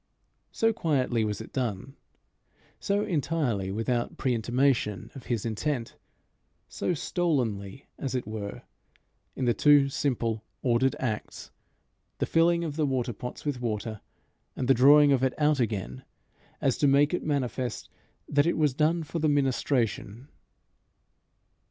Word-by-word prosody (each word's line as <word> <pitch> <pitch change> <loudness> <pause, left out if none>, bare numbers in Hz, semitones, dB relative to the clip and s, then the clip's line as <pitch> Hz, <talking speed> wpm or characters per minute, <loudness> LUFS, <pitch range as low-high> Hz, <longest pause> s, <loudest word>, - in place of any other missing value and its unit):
So 225 0 +2
quietly 130 - 0
was 105 -1 -2
it 110 - -11
done, 125 0 -3 0.8
so 200 0 0
entirely 145 - -1
without 120 +3 -2
pre 130 - 0
intimation 120 -2 0
of 135 - -11
his 115 -4 -1
intent, 115 +2 -2 0.7
so 180 - -2
stolenly, 135 - -2
as 135 -2 -3
it 125 - -2
were, 105 -1 -6 0.7
in 130 - -2
the 120 - +3
two 145 0 +5
simple 115 -6 -1 0.2
ordered 130 +1 +2
acts, 110 -4 -4 0.7
the - - 0
filling 170 +1 +3
of 155 -2 -4
the 155 -2 +1
water 125 -3 -1
pots 125 +7 -8
with 140 -4 -2
water, 110 -2 -3 0.5
and 125 - -2
the 135 - +6
drawing 145 +3 +6
of 135 -2 +3
it 130 -1 +1
out 150 -1 +2
again, 95 - -2 0.6
as 135 -3 +1
to 145 - +4
make 140 +3 +4
it 180 - 0
manifest 130 -4 -2 0.4
that 145 +2 +2
it 170 - +1
was 150 -4 +2
done 160 +4 +1
for 160 +2 -4
the 155 -1 +2
ministration. 130 -3 0
130 Hz, 140 wpm, -27 LUFS, 115-150 Hz, 0.8 s, the